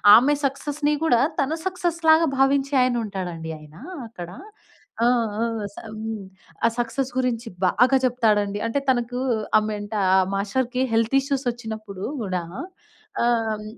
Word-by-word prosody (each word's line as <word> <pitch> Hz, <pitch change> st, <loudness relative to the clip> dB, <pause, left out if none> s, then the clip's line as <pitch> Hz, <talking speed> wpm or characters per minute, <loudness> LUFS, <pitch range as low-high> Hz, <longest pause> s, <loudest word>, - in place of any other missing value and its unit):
ఆమె 285 Hz, +5 st, +5 dB
సక్సెస్‌ని 290 Hz, +2 st, 0 dB
కూడా 240 Hz, -6 st, +4 dB, 0.2 s
తన 275 Hz, +3 st, 0 dB
సక్సెస్‌లాగా 335 Hz, -3 st, +3 dB
భావించే 275 Hz, +1 st, +2 dB
ఆయన 250 Hz, -1 st, +1 dB
ఉంటాడండి 175 Hz, -5 st, -5 dB
ఆయన 150 Hz, 0 st, -15 dB, 0.3 s
అక్కడ. 175 Hz, -6 st, -8 dB, 0.7 s
ఆ! -, -, +5 dB, 0.4 s
ఆ! -, -, +3 dB, 0.3 s
స -, -, -23 dB, 0.2 s
హ్మ్. 220 Hz, -1 st, -5 dB, 0.4 s
ఆ -, -, +7 dB
సక్సెస్ 245 Hz, +3 st, -1 dB
గురించి 250 Hz, -2 st, -1 dB, 0.2 s
బాగా 250 Hz, +8 st, +4 dB
చెప్తాడండి. 210 Hz, -5 st, +2 dB
అంటే 230 Hz, +5 st, 0 dB
తనకు 245 Hz, -1 st, +1 dB, 0.4 s
ఆహ్, 215 Hz, -, +2 dB
మెంటార్ 205 Hz, -1 st, -2 dB
ఆ -, -, +6 dB
మాస్టర్‌కి 245 Hz, +6 st, -1 dB
హెల్త్ 230 Hz, +3 st, +2 dB
ఇష్యూస్ 275 Hz, 0 st, -2 dB
వచ్చినప్పుడు 220 Hz, -4 st, -7 dB, 0.2 s
కూడా 185 Hz, -3 st, -1 dB, 0.8 s
ఆహ్, 225 Hz, -3 st, +1 dB
235 Hz, 130 wpm, -24 LUFS, 210-270 Hz, 0.8 s, ఆ